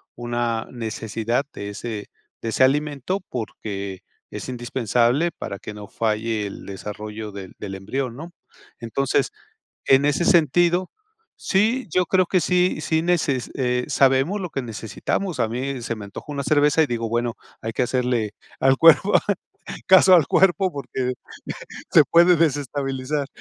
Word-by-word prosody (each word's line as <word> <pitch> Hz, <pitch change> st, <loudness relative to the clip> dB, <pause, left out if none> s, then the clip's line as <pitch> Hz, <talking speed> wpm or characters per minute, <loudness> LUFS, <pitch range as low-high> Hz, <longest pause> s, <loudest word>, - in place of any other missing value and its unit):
una 120 Hz, -1 st, -2 dB
necesidad 115 Hz, +1 st, -2 dB
de 100 Hz, -, -6 dB
ese 105 Hz, 0 st, -6 dB, 0.3 s
de 115 Hz, -, -3 dB
ese 130 Hz, -, +2 dB
alimento, 145 Hz, +6 st, +1 dB
porque 100 Hz, -5 st, -5 dB, 0.3 s
es -, -, -7 dB
indispensable 120 Hz, +5 st, +1 dB
para 100 Hz, -, -7 dB
que 105 Hz, -, -8 dB
no 105 Hz, -1 st, -9 dB
falle 110 Hz, -1 st, -1 dB
el -, -, -9 dB
desarrollo 105 Hz, +2 st, -7 dB
del 95 Hz, -2 st, -8 dB
del 100 Hz, -2 st, -6 dB
embrión, 120 Hz, +6 st, -3 dB
¿no? 165 Hz, +6 st, -9 dB, 0.5 s
Entonces, 130 Hz, -, 0 dB, 0.6 s
en 135 Hz, +1 st, +5 dB
ese 145 Hz, +4 st, +1 dB
sentido, 175 Hz, +3 st, +3 dB, 0.5 s
sí, 225 Hz, +6 st, +1 dB
yo 180 Hz, -1 st, +2 dB
creo 185 Hz, +2 st, +3 dB
que 185 Hz, +1 st, +2 dB
sí, 180 Hz, +2 st, +2 dB
sí 160 Hz, 0 st, 0 dB
neces 155 Hz, -7 st, 0 dB
eh, 125 Hz, -1 st, 0 dB
sabemos 135 Hz, +9 st, +3 dB
lo 180 Hz, -, -4 dB
que 135 Hz, -, -3 dB
necesitamos. 120 Hz, -, -3 dB
A 115 Hz, -, +2 dB
mí 130 Hz, +2 st, -3 dB
se 115 Hz, -, -3 dB
me 105 Hz, -, -8 dB
antojó 100 Hz, +8 st, -8 dB
una 140 Hz, -1 st, -3 dB
cerveza, 150 Hz, +2 st, +4 dB
y 155 Hz, -, +2 dB
digo: 115 Hz, -1 st, -2 dB
"Bueno, 120 Hz, 0 st, 0 dB, 0.3 s
hay 115 Hz, 0 st, -3 dB
que -, -, 0 dB
hacerle 125 Hz, -4 st, 0 dB, 0.3 s
al 135 Hz, 0 st, +4 dB
cuerpo 165 Hz, +5 st, +6 dB, 0.7 s
caso 190 Hz, 0 st, +7 dB
al 165 Hz, -5 st, +5 dB
cuerpo 190 Hz, 0 st, +3 dB
porque 130 Hz, -2 st, -3 dB, 0.8 s
se -, -, +7 dB
puede 175 Hz, +1 st, +5 dB
desestabilizar". 140 Hz, -2 st, -1 dB
130 Hz, 150 wpm, -23 LUFS, 115-160 Hz, 0.8 s, caso